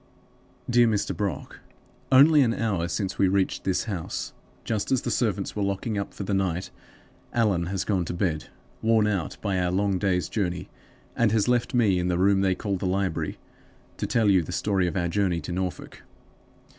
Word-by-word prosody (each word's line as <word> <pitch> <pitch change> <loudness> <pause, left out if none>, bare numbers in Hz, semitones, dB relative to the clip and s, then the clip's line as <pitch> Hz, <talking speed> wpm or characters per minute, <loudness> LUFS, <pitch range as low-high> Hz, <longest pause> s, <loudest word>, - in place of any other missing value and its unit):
"DEAR 120 -1 +4
MR. 105 -2 0
BROCK 100 -3 -4 0.5
Only 145 +3 +7
an 120 -3 +2
hour 95 -7 -1
since 95 +2 -3
we 95 - +5
reached 95 0 0
this 95 -2 +1
house, 95 -8 -4 0.3
just 110 -3 -2
as 130 - +2
the - - -2
servants 105 -5 -1
were 105 - -2
locking 100 +3 -1
up 100 -1 -3
for - - -6
the 100 - -2
night. 95 -2 -1 0.6
Allan 100 -7 +1
has 95 0 -2
gone 95 -4 0
to 85 - -4
bed, 80 -5 -1 0.4
worn 110 -1 +3
out 95 -8 -2
by 100 -3 0
our 90 -1 +1
long 95 0 +1
day's 90 -4 0
journey, 90 -3 -2 0.5
and 115 -3 +2
has 110 0 +2
left 125 +1 +1
me 105 -7 +3
in 90 - -1
the 90 -1 +1
room 95 +1 +3
they 95 -1 +2
call 100 0 -2
the 95 - -2
library, 95 -2 -1 0.6
to - - -2
tell 115 -2 +2
you 95 -3 +5
the 80 - -7
story 95 -3 0
of 90 - -2
our 85 -1 0
journey 90 -1 0
to 75 - -6
Norfolk. 90 0 -4
95 Hz, 195 wpm, -26 LUFS, 90-105 Hz, 0.6 s, Only